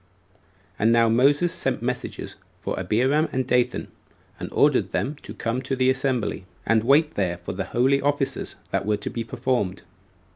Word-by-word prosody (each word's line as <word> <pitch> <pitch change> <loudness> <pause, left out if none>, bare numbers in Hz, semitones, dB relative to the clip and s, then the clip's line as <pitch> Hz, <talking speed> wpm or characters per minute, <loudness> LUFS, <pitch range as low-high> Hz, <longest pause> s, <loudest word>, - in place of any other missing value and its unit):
And 110 +3 +4
now 115 -1 +4
Moses 140 +9 +3
sent - - -2
messengers - - -4 0.2
for - - -3
Abiram 135 +8 +2
and 130 0 -1
Dathan, 125 -1 +1 0.5
and - - -5
ordered - - +3
them 145 +3 -1
to - - -10
come 115 +3 -2
to 135 +1 -2
the 130 0 +3
assembly, 125 -8 -1 0.2
and 110 -1 +3
wait 150 +5 +4
there 90 -3 -1
for 85 - -6
the 95 +1 -3
holy 135 +3 +2
offices 145 -1 -1 0.2
that 100 +1 -1
were 105 -1 +2
to 105 - -5
be 115 - -3
performed. 110 -4 -2
125 Hz, 170 wpm, -24 LUFS, 110-135 Hz, 0.5 s, And